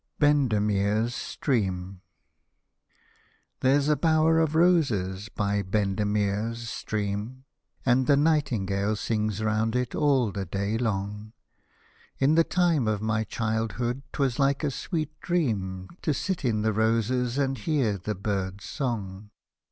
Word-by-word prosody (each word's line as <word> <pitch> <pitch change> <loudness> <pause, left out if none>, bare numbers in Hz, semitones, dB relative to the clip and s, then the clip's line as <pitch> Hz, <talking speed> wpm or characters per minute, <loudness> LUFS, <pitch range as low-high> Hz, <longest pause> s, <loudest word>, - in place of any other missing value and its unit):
BENDEMEER'S 110 -6 +2
STREAM 95 - -2 1.6
There's 140 +2 +3
a 150 - +4
bower 160 +2 +3
of 160 -1 +1
roses 110 - +2
by 100 -1 -1
Bendemeer's 105 +3 -1
stream, 105 +4 -3 0.4
And 125 0 +3
the 140 - +5
nightingale 115 -10 +1
sings 105 -1 -1
round 110 +1 0
it 125 -1 -1
all 135 -7 +2
the 100 0 -4
day 100 +5 -1
long; 105 -1 -3 0.8
In 135 +3 +3
the 165 +1 +5
time 170 -9 +1
of 110 -1 -1
my 110 0 +1
childhood 115 +3 -2
'twas 135 -4 -1
like 140 +2 +2
a 145 - +1
sweet 155 0 -4
dream. 100 - -1
To 150 - 0
sit 190 +2 -2
in 110 -4 +1
the 110 0 +1
roses 115 +3 +1
and 135 -1 +1
hear 135 -8 0
the 105 +4 -3
bird's 95 0 -3
song. 105 -7 -4
110 Hz, 125 wpm, -27 LUFS, 105-140 Hz, 1.6 s, the